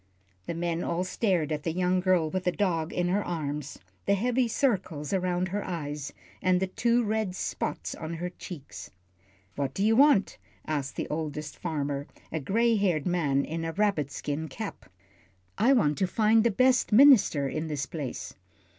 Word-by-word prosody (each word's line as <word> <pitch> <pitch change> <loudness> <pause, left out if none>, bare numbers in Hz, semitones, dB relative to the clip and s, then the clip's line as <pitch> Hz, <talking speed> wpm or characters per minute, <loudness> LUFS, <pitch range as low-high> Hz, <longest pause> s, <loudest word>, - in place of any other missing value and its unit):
The - - -3
men 170 0 -1
all 170 +1 -1
stared 185 -5 0
at 150 -1 -1
the 165 - -2
young 180 +1 +1
girl 180 -3 +2
with 185 0 -2
the 180 - +3
dog 175 -5 -1
in 175 0 0
her 200 +3 +1
arms, 150 -4 -4 0.3
the 200 - +4
heavy 245 +4 +1
circles 190 - -1
around 185 -1 0
her 205 +3 -2
eyes, 150 -5 -4 0.3
and 185 -1 +3
the 190 - +1
two 235 +5 +1
red 215 -3 -1
spots - - -3
on 160 +1 -6
her 175 +2 -3
cheeks. 165 -5 -9 0.7
"What 140 -2 -2
do 195 - +1
you 220 +1 +4
want?" 275 -6 +4 0.3
asked 145 -3 -3
the - - -3
oldest 150 -1 -4
farmer, 145 -4 -3 0.2
a 160 - -2
gray 225 - +2
haired 180 -8 +1
man 150 -6 +1
in 165 +1 -4
a 165 0 -3
rabbit 195 -8 +1
skin 145 +3 -4
cap. 135 - -7 0.7
"I 240 +5 +5
want 150 - +3
to 190 - +2
find 220 +3 +3
the 235 - +4
best 255 +4 +3
minister 215 - +6
in 155 +4 -3
this 145 -3 -2
place." 145 -7 -6
180 Hz, 175 wpm, -28 LUFS, 155-205 Hz, 0.7 s, minister